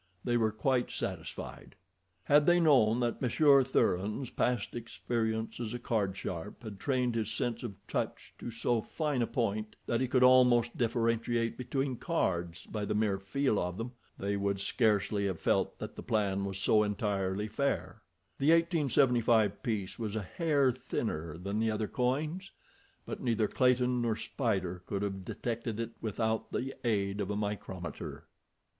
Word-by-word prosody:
They 120 Hz, -, +1 dB
were 110 Hz, -2 st, +3 dB
quite 125 Hz, +3 st, +1 dB
satisfied. -, -, -6 dB, 0.5 s
Had 145 Hz, 0 st, +4 dB
they 175 Hz, 0 st, +6 dB
known 125 Hz, -8 st, +4 dB
that 120 Hz, -1 st, -1 dB
Monsieur 140 Hz, +2 st, +5 dB
Thuran's 110 Hz, -1 st, 0 dB
past 120 Hz, -4 st, 0 dB
experience 115 Hz, -1 st, -2 dB
as 120 Hz, 0 st, -3 dB
a -, -, -1 dB
card 105 Hz, -5 st, -1 dB
sharp 90 Hz, +5 st, -6 dB
had 105 Hz, -3 st, -8 dB
trained 125 Hz, -2 st, +1 dB
his 110 Hz, -2 st, -1 dB
sense 115 Hz, +1 st, -1 dB
of 105 Hz, -6 st, -6 dB
touch -, -, -3 dB
to -, -, -5 dB
so 115 Hz, 0 st, 0 dB
fine 150 Hz, 0 st, -1 dB
a 115 Hz, -, +1 dB
point 110 Hz, -4 st, -2 dB
that 120 Hz, +1 st, 0 dB
he 130 Hz, -, +1 dB
could 125 Hz, 0 st, +3 dB
almost 125 Hz, -2 st, +5 dB
differentiate 115 Hz, 0 st, 0 dB
between 130 Hz, +1 st, -2 dB
cards 85 Hz, -4 st, -1 dB
by 105 Hz, -1 st, -4 dB
the 105 Hz, +1 st, -1 dB
mere 105 Hz, -2 st, +1 dB
feel 110 Hz, +3 st, 0 dB
of 90 Hz, +1 st, -2 dB
them, 115 Hz, +3 st, -4 dB, 0.3 s
they 100 Hz, +1 st, -1 dB
would 100 Hz, 0 st, 0 dB
scarcely 105 Hz, -1 st, +1 dB
have 95 Hz, -4 st, -3 dB
felt -, -, +1 dB
that -, -, -7 dB
the -, -, -7 dB
plan 100 Hz, -3 st, 0 dB
was 95 Hz, -1 st, -3 dB
so 105 Hz, +2 st, +4 dB
entirely 100 Hz, -1 st, -1 dB
fair. 140 Hz, +6 st, -2 dB, 0.4 s
The 140 Hz, -, +3 dB
1875 125 Hz, -, +3 dB
piece 105 Hz, -4 st, -3 dB
was 110 Hz, -2 st, -3 dB
a 110 Hz, -, -1 dB
hair 145 Hz, -, +2 dB
thinner 85 Hz, -, -3 dB
than 100 Hz, +4 st, -3 dB
the 110 Hz, 0 st, +2 dB
other 110 Hz, 0 st, -1 dB
coins, 150 Hz, -, -1 dB, 0.6 s
but -, -, -6 dB
neither 115 Hz, -3 st, +1 dB
Clayton 125 Hz, 0 st, +2 dB
nor 115 Hz, -2 st, +1 dB
Spider 95 Hz, -9 st, -2 dB
could 100 Hz, 0 st, -2 dB
have 95 Hz, -2 st, -3 dB
detected 115 Hz, +2 st, -4 dB
it 115 Hz, 0 st, -3 dB
without 110 Hz, +1 st, -1 dB
the 135 Hz, +2 st, -2 dB
aid 100 Hz, -3 st, 0 dB
of 100 Hz, -, -3 dB
a 105 Hz, -, -1 dB
micrometer. 100 Hz, -4 st, -5 dB
115 Hz, 165 wpm, -31 LUFS, 100-125 Hz, 0.6 s, they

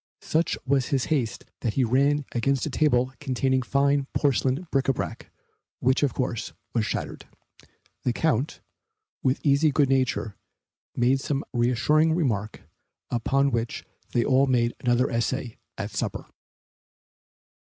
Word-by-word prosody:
Such 160 Hz, +1 st, 0 dB
was 135 Hz, -2 st, +2 dB
his 135 Hz, -3 st, 0 dB
haste 125 Hz, -7 st, -2 dB
that 110 Hz, -3 st, -2 dB
he 135 Hz, -, +3 dB
ran 140 Hz, +4 st, +2 dB
against 135 Hz, +2 st, 0 dB
a 155 Hz, -, -3 dB
table 130 Hz, -3 st, +2 dB
containing 130 Hz, 0 st, 0 dB
fine 140 Hz, +2 st, +1 dB
porcelain 135 Hz, +3 st, +1 dB
bric 135 Hz, -1 st, +1 dB
a 135 Hz, -, +4 dB
brac, 95 Hz, -9 st, -5 dB, 0.5 s
which, 130 Hz, +2 st, +2 dB
of 145 Hz, -4 st, +1 dB
course, 125 Hz, -3 st, -2 dB, 0.2 s
was 110 Hz, -3 st, +1 dB
shattered. -, -, -4 dB, 0.7 s
The 125 Hz, -, 0 dB
Count, 145 Hz, +1 st, 0 dB, 0.6 s
with 130 Hz, +1 st, +1 dB
easy 145 Hz, +2 st, +4 dB
good 140 Hz, -1 st, +2 dB
nature, 130 Hz, -5 st, 0 dB, 0.6 s
made 125 Hz, +3 st, +3 dB
some 140 Hz, +1 st, -2 dB
reassuring 130 Hz, +7 st, +3 dB
remark, 110 Hz, -, -1 dB, 0.5 s
upon 135 Hz, +4 st, +1 dB
which 115 Hz, -1 st, -2 dB, 0.3 s
they 120 Hz, -, +2 dB
all 135 Hz, 0 st, +4 dB
made 120 Hz, -2 st, +2 dB
another 125 Hz, +1 st, +2 dB
essay 115 Hz, +1 st, -2 dB, 0.2 s
at -, -, -4 dB
the -, -, -8 dB
supper. -, -, -3 dB
130 Hz, 140 wpm, -26 LUFS, 120-140 Hz, 0.7 s, a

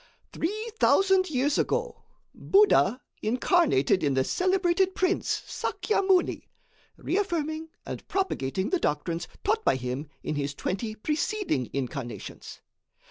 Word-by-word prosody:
Three 430 Hz, +7 st, -3 dB
thousand 380 Hz, -1 st, +4 dB
years 285 Hz, +1 st, +1 dB
ago, -, -, -1 dB, 0.3 s
Buddha 375 Hz, -, +4 dB, 0.2 s
incarnated 245 Hz, -, +2 dB
in 140 Hz, -2 st, +1 dB
the 130 Hz, -, +3 dB
celebrated 370 Hz, -, +1 dB
Prince 370 Hz, +1 st, 0 dB
Sakya 430 Hz, -, -1 dB
Muni, 380 Hz, -2 st, +1 dB, 0.5 s
reaffirming 320 Hz, -5 st, -2 dB, 0.2 s
and -, -, -7 dB
propagating 190 Hz, -, -1 dB
the 370 Hz, -, +2 dB
doctrines 165 Hz, -, -1 dB, 0.2 s
taught 440 Hz, +2 st, +1 dB
by -, -, +3 dB
him 130 Hz, +3 st, -4 dB, 0.2 s
in -, -, -2 dB
his 140 Hz, -1 st, -2 dB
twenty 215 Hz, +7 st, -3 dB
preceding 300 Hz, -, -1 dB
incarnations. 135 Hz, -2 st, -6 dB
310 Hz, 115 wpm, -27 LUFS, -, 0.5 s, thousand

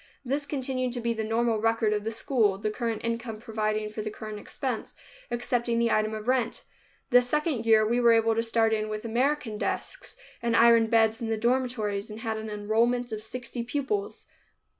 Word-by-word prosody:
This 275 Hz, +4 st, 0 dB
has 285 Hz, -, -10 dB
continued 255 Hz, -3 st, -2 dB
to 245 Hz, -, -3 dB
be 235 Hz, 0 st, 0 dB
the 220 Hz, -1 st, -3 dB
normal 225 Hz, 0 st, +1 dB
record 225 Hz, -1 st, +2 dB
of 210 Hz, -1 st, -1 dB
the 220 Hz, -, -2 dB
school, 225 Hz, -3 st, +1 dB
the 210 Hz, +1 st, -2 dB
current 230 Hz, -1 st, -3 dB
income 230 Hz, -1 st, -3 dB
providing 215 Hz, -2 st, -2 dB
for 215 Hz, 0 st, -5 dB
the 215 Hz, -, -3 dB
current 215 Hz, 0 st, -7 dB
expense, 245 Hz, +2 st, -4 dB, 0.3 s
excepting 240 Hz, -1 st, 0 dB
the 235 Hz, 0 st, +2 dB
item 215 Hz, 0 st, +1 dB
of 215 Hz, +1 st, -7 dB
rent. 255 Hz, -2 st, 0 dB, 0.5 s
The 245 Hz, 0 st, +7 dB
second 265 Hz, -2 st, -1 dB
year 215 Hz, -1 st, +5 dB
we 240 Hz, +2 st, +1 dB
were 235 Hz, -1 st, +6 dB
able 225 Hz, 0 st, +3 dB
to 225 Hz, -, +1 dB
start 225 Hz, -1 st, +2 dB
in 215 Hz, 0 st, -1 dB
with 215 Hz, +1 st, -5 dB
American 240 Hz, -1 st, 0 dB
desks, -, -, -4 dB, 0.2 s
and 235 Hz, -1 st, +1 dB
iron 230 Hz, -1 st, +6 dB
beds 225 Hz, 0 st, +3 dB
in 230 Hz, -, -2 dB
the 225 Hz, 0 st, 0 dB
dormitories, 230 Hz, -4 st, 0 dB
and 215 Hz, +1 st, -8 dB
had 225 Hz, -1 st, -2 dB
an 220 Hz, 0 st, -5 dB
enrollment 230 Hz, +4 st, 0 dB
of 215 Hz, -1 st, -4 dB
sixty 240 Hz, +2 st, -5 dB
pupils. 290 Hz, -, -3 dB
230 Hz, 200 wpm, -27 LUFS, 215-245 Hz, 0.5 s, The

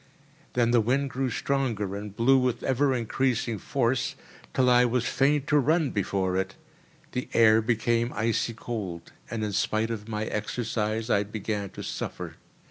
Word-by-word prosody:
Then 120 Hz, -1 st, +2 dB
the 120 Hz, -1 st, +5 dB
wind 130 Hz, +5 st, 0 dB
grew 130 Hz, 0 st, -1 dB
stronger 115 Hz, -6 st, -1 dB
and 100 Hz, 0 st, -7 dB
blew 130 Hz, +4 st, +5 dB
with 125 Hz, -2 st, 0 dB
ever 135 Hz, +1 st, +2 dB
increasing 120 Hz, -1 st, 0 dB
force, 125 Hz, 0 st, 0 dB, 0.4 s
till 130 Hz, -, +2 dB
I 125 Hz, 0 st, +6 dB
was 120 Hz, 0 st, +1 dB
fain 140 Hz, +1 st, +2 dB
to 150 Hz, 0 st, +3 dB
run 155 Hz, +1 st, +2 dB
before 95 Hz, -2 st, 0 dB
it. 95 Hz, +1 st, -2 dB, 0.6 s
The 125 Hz, -, -3 dB
air 110 Hz, -1 st, +6 dB
became 115 Hz, +1 st, +1 dB
icy 115 Hz, +1 st, 0 dB
cold, 100 Hz, -8 st, -5 dB, 0.2 s
and 115 Hz, -2 st, -3 dB
in 105 Hz, -, -1 dB
spite 110 Hz, +3 st, 0 dB
of 105 Hz, -2 st, -5 dB
my 105 Hz, -1 st, -2 dB
exercise 110 Hz, 0 st, -2 dB
I 100 Hz, -, +4 dB
began 105 Hz, -1 st, -3 dB
to -, -, -5 dB
suffer. -, -, -5 dB
115 Hz, 160 wpm, -27 LUFS, 105-125 Hz, 0.6 s, I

